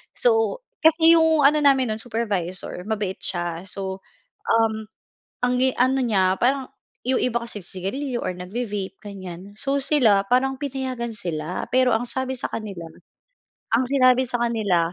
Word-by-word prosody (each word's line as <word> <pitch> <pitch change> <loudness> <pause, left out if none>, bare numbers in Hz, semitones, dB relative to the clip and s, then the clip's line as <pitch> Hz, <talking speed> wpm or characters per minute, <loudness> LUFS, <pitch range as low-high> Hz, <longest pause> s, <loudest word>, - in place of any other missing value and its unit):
So, 480 +1 +2 0.2
kasi 325 +1 +6
yung 320 -2 +4
ano 300 +2 +5
namin 270 -5 +3
no'n, 215 - -3
supervisor, 200 -6 -3
mabait 205 -4 -2
siya. 175 0 -3
So, 190 -1 -5 0.5
uhm, 220 -1 +1 0.6
ang 250 0 +1
i 260 0 +4
ano 260 +2 +3
niya, 190 -5 +2
parang 265 +1 +2 0.4
yung 260 0 +2
iba 240 -1 +1
kasi 230 -4 -5
sigarilyo 240 +9 -3
or 180 - -3
nag-ve 195 +7 -4
vape, 200 -2 -5
ganyan. 195 -1 -9
So, 275 +5 0
sila 225 -9 +3
parang 260 +2 +1
pinayagan 260 -5 -4
sila, 170 -4 -3
pero 255 -2 +4
ang 225 - 0
sabi 260 +1 -2
sa 250 - -4
kanila, 200 -6 -5 0.9
ang 255 +3 +3
sinabi 255 -2 +4
sa 245 - 0
kanila 200 -8 +1
235 Hz, 155 wpm, -23 LUFS, 195-265 Hz, 0.9 s, kasi